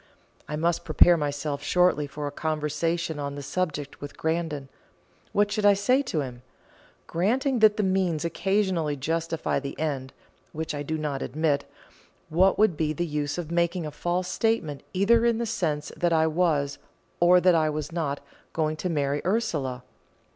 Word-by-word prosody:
I 150 - -3
must 165 +2 0
prepare 170 +2 +6
myself 145 -1 -2
shortly 180 -4 +2
for 145 +1 -6
a 145 - -3
conversation 155 +2 -2
on 140 0 -4
the 145 - -6
subject 150 -2 -3
with 145 0 -8
Grandon. 160 -4 -2 0.6
What 205 0 +2
should 215 0 -1
I 205 -1 +6
say 250 +7 +3
to 215 - -2
him? 125 -3 -7 0.6
Granting 250 - +1
that 215 -1 +5
the 210 - +1
means 185 -5 +1
occasionally 185 -4 0
justify 165 +3 -1
the 140 0 -7
end, 140 -4 -2 0.4
which 160 0 -3
I 145 - -3
do 155 +2 -2
not 150 -3 -3
admit, 150 +1 0 0.6
what 185 +4 +3
would 215 -5 +4
be 155 0 0
the 175 +3 -2
use 150 -1 -2
of 170 -2 -5
making 170 0 0
a 150 - -5
false 175 +4 -2
statement 185 -8 0
either 220 +5 +3
in 235 -1 +3
the 235 - -1
sense 155 -9 -2
that 175 -1 +1
I 160 0 +4
was, 155 -4 +1 0.4
or 180 +1 +6
that 180 0 +5
I 160 -2 +3
was 150 +1 -4
not, 150 -4 -2 0.3
going 155 -1 0
to 180 - -2
marry 145 -2 0
Ursula? 150 - -1
160 Hz, 170 wpm, -26 LUFS, 145-180 Hz, 0.6 s, prepare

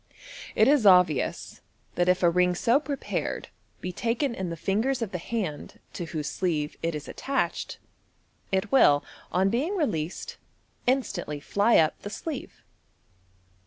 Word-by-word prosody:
It 215 - +5
is 275 -6 +5
obvious 180 -6 +3 0.3
that 175 0 +1
if 180 0 +2
a 175 - +6
ring 180 +1 +3
so 235 +9 +3
prepared 290 -2 -3 0.3
be 180 - -3
taken 235 +7 -1
in 190 -5 -4
the 165 -1 -6
ringers 230 +6 +1
of 210 - -5
the 180 - -3
hand 185 -6 -4
to 175 - -4
whose 155 -2 -4
sleeve 155 -5 -1
it 165 -1 -1
is 150 -1 -6
attached, 275 0 -2 0.7
it 190 -1 0
will, 145 - +5 0.3
on 190 +3 +2
being 295 - 0
released, 175 - -2 0.5
instantly 195 - 0
fly 205 +9 +3
up 155 -1 +2
the 205 - -6
sleeve. 285 +5 -6
190 Hz, 145 wpm, -27 LUFS, 170-240 Hz, 0.7 s, a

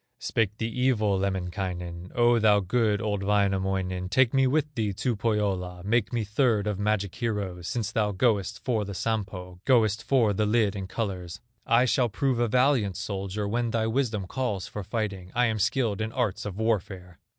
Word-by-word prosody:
Spake 105 -2 -1
the 110 - -2
evil 115 -5 +1
Lemminkainen: 90 -2 -3
"O, 120 0 +4
thou 105 -2 +5
good, 105 +1 +1
old 105 -2 -1
Wainamoinen, 95 -2 0
Take 130 +2 +3
me 135 -1 +4
with 150 +2 0
thee 105 -5 -1
to 120 +5 -1
Pohyola, 100 -5 -1
Make 105 +1 +1
me 120 -2 -1
third 105 0 +1
of 105 -2 -2
magic 105 -2 0
heroes, 100 -7 -3
Since 110 -4 -2
thou 105 -2 +1
goest 105 0 0
for 115 -4 +1
the 100 -1 -6
Sampo, 95 -5 -3
Goest 110 -4 +3
for 115 -4 +2
the 105 +2 0
lid 105 -2 +2
in 95 -1 -5
colors; 90 -5 -4 0.3
I 120 +2 +4
shall 125 -1 +2
prove 130 +3 0
a 120 - +2
valiant 125 -5 +2
soldier, 100 0 -3
When 120 +3 0
thy 110 0 0
wisdom 110 -4 -1
calls 105 -4 -2
for 105 - -6
fighting; 100 -3 -4
I 125 +1 +4
am 110 -2 0
skilled 110 -1 0
in 110 +1 -2
arts 115 -6 -1
of 100 -2 -5
warfare!" 95 -5 -2
105 Hz, 180 wpm, -27 LUFS, 95-115 Hz, 0.3 s, thou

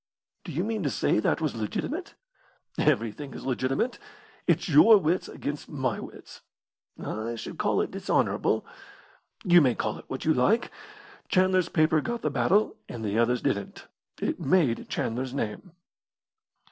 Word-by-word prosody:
"Do 175 - -7
you 165 +5 -1
mean 220 0 -2
to 145 - 0
say 105 - +1
that 110 - +1
was 155 -3 0
legitimate?" 280 - -4 0.6
"Everything 130 -1 0
is - - -8
legitimate. 135 - -1 0.5
It's - - +2
your 230 -8 +8
wits 175 0 0
against 145 +1 -5
my 130 -7 -2
wits." - - -11 0.6
"I 115 +2 -4
should 115 - -8
call - - +2
it - - -3
dishonourable." - - 0 0.8
"You 175 -1 +6
may 130 -5 +3
call 105 - -2
it - - -14
what 130 - -5
you 160 - +4
like. 205 - +2 0.6
Chandler's 185 -1 +3
paper 155 -1 +3
got 235 +5 -4
the 150 - 0
battle 160 - +2
and 115 -2 -6
the 105 +2 0
other's 120 +1 +2
didn't. 100 - -2 0.3
It - - -2
made 145 -7 +1
Chandler's 125 +3 -2
name." 135 - -4
145 Hz, 150 wpm, -27 LUFS, 120-185 Hz, 0.8 s, your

